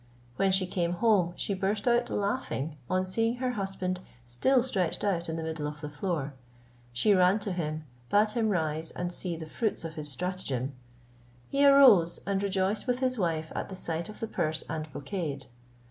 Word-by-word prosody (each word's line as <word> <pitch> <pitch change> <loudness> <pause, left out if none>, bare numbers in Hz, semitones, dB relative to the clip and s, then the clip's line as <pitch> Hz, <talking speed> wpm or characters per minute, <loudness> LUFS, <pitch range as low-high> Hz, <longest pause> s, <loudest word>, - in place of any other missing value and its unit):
When 195 +7 +2
she 190 0 +3
came 175 -1 -1
home 185 -3 +3
she 200 - -2
burst 200 +3 -1
out 240 0 +3
a - - -2
laughing 200 - -2
on 185 0 +1
seeing 225 +5 0
her 255 0 -1
husband 195 -4 -2 0.3
still 145 - +3
stretched 190 -10 -1
out 175 -5 0
in 160 - -2
the 165 - -3
middle 160 -2 -3
of 150 0 -6
the 150 -1 -6
floor; 150 -3 -2 0.6
she 120 - +3
ran 185 +1 +5
to 205 - -2
him, 155 -3 -3 0.3
bade 210 +1 +4
him 220 0 +1
rise 160 -4 0
and 175 0 -4
see 175 -1 -1
the 160 0 -6
fruits 205 +3 -2
of 160 - -5
his 150 -2 -6
stratagem. 140 -4 -3 0.8
He 280 +1 +2
arose, 235 -12 +7
and 195 0 0
rejoiced 200 +3 0
with 250 0 +2
his 255 -2 +1
wife 160 -3 -1
at - - -4
the 190 - -6
sight 170 -1 -3
of 215 - -10
the 225 - -1
purse 160 -6 -1
and 155 -1 -4
brocade. 145 -1 -4
185 Hz, 190 wpm, -29 LUFS, 160-205 Hz, 0.8 s, arose